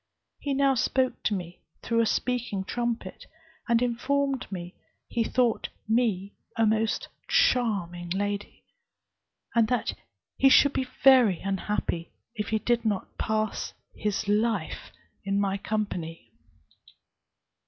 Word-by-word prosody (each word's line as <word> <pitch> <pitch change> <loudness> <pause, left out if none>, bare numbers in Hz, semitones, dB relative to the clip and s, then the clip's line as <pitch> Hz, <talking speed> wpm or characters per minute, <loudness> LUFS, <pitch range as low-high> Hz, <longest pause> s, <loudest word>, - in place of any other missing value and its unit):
He 280 -1 -2
now 275 0 +4
spoke 255 +1 +1
to 210 - +2
me 175 -2 -6 0.2
through 230 0 +2
a 225 - +2
speaking 240 -6 -1
trumpet, 235 +3 -3 0.4
and 235 +1 +4
informed 265 +2 0
me 175 -1 -6 0.3
he 235 - 0
thought 240 -1 +1 0.2
me 215 -4 +1 0.2
a 225 - +4
most 220 +1 +1 0.2
charming 205 - +1
lady, 205 +2 -3 0.9
and 230 -2 +4
that 250 0 0 0.4
he 270 - +6
should 285 +1 +6
be 260 - -1 0.2
very 250 -9 +7
unhappy 195 -3 -2 0.2
if 210 -3 -3
he 220 - +2
did 235 +2 +1
not 210 -4 -2
pass 215 -1 -1 0.2
his 210 0 -2
life 210 -3 0 0.3
in 200 0 0
my 195 -1 +1
company. 185 -7 -3
220 Hz, 120 wpm, -27 LUFS, 200-245 Hz, 0.9 s, very